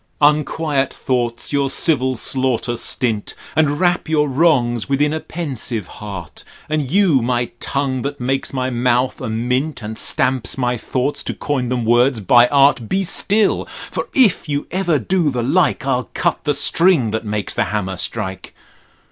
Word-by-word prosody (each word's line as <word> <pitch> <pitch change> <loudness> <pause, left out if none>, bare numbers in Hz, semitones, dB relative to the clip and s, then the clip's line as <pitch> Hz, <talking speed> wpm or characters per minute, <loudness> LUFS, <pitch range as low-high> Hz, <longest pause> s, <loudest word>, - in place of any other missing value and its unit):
Unquiet 150 -2 +2
thoughts 120 0 -2
your 140 -1 +1
civil 130 -3 +1
slaughter 130 -1 -1
stint, 115 -2 -2 0.2
and 150 -1 +2
wrap 175 -2 +1
your 150 -2 +2
wrongs 130 -5 +2
within 145 +2 +2
a 160 - -1
pensive 130 - -4
heart: 95 -4 -9 0.2
and 150 -3 -1
you 175 -7 +3
my 120 0 -1
tongue 135 -2 -1
that 140 +2 -4
makes 135 +2 -1
my 130 -1 -2
mouth 125 +1 +1
a - - -3
mint, 125 +5 -1
and 110 +1 -5
stamps 130 -1 0
my 125 -1 0
thoughts 130 +4 -2
to - - -4
coin 130 -4 -2
them 125 -2 -1
words 120 +2 +3
by 120 +5 +5
art, 140 -4 +3
Be 195 0 +1
still: 205 +3 +1 0.3
for - - -3
if 220 - +3
you 145 0 -1
ever 175 -4 +1
do 170 - +1
the 125 -3 -2
like, 145 +1 +1
I'll 130 -2 -1
cut 170 - -1
the 145 -2 +1
string 160 - +3
that 110 +1 -2
makes 105 -2 -3
the - - 0
hammer 95 -3 -2
strike. 95 +1 -4
130 Hz, 165 wpm, -19 LUFS, 120-150 Hz, 0.3 s, by